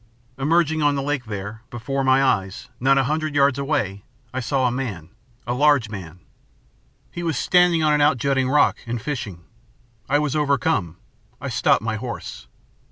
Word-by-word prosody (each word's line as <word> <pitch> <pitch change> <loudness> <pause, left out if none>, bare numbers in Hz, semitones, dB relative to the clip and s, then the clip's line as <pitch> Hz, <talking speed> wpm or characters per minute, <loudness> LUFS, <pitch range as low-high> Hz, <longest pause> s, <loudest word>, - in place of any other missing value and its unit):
"Emerging 160 +2 +2
on 145 -1 +3
the 140 - -1
lake, 140 -3 -2
there, 105 +1 -6
before 135 +3 -3
my 130 +1 +4
eyes, 95 -7 -1
not 135 +2 +3
a 135 - +3
hundred 155 +2 -2
yards 140 -1 +3
away, 105 -9 -2 0.3
I 130 - -2
saw 130 +1 0
a 125 - +2
man, 110 - -5 0.4
a 120 - -1
large 140 -3 +3
man. 90 -4 -8 0.9
He 175 - -6
was 165 -5 -1
standing 180 -2 +3
on 150 -1 +3
an 150 - +2
outjutting 135 -2 +2
rock 145 +2 +3
and 120 0 -2
fishing. 115 - -5 0.7
I 145 - +4
was 150 -1 -1
overcome. 140 - 0 0.4
I - - -5
stopped - - +2
my 110 -1 -2
horse. 115 - -7
135 Hz, 165 wpm, -22 LUFS, 110-150 Hz, 0.9 s, my